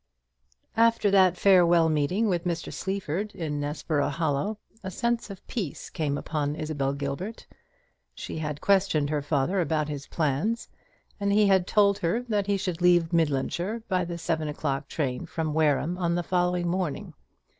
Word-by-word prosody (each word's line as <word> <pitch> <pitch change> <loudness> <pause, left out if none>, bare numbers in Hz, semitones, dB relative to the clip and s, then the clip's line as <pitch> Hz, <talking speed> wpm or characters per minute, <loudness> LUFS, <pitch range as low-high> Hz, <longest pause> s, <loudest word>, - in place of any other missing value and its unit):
After 230 -2 +3
that 185 -2 +5
farewell 175 -4 +5
meeting 160 +8 +1
with 175 -4 0
Mr. 170 -2 -3
Sleaford 195 +1 -3
in 150 -4 -3
Nessborough 145 0 -1
Hollow, 160 +7 -1 0.2
a 190 - -5
sense 235 +4 -1
of 195 -2 -10
peace 200 - -5
came 145 -3 -1
upon 150 -1 -2
Isabel 150 -3 -2
Gilbert. 140 +10 -5 0.7
She - - -6
had 150 -2 -4
questioned 185 -7 +2
her 150 -1 0
father 150 +6 +1
about 155 -2 0
his 145 -1 -5
plans, 160 +9 -1 0.5
and 200 0 0
he 210 +1 +5
had 190 -2 +3
told 200 -1 +3
her 175 +9 0
that 210 -5 -1
he 200 -1 +2
should 180 -3 -3
leave 175 -1 +4
Midlandshire 170 - 0
by 185 -2 +1
the 170 0 -5
seven 165 -2 -1
o'clock 145 -2 -2
train 130 -5 -3
from 160 -2 -2
Wareham 155 +3 +1
on 170 -1 +1
the 175 - -1
following 180 0 0
morning. 175 -4 -2
170 Hz, 160 wpm, -27 LUFS, 150-195 Hz, 0.7 s, that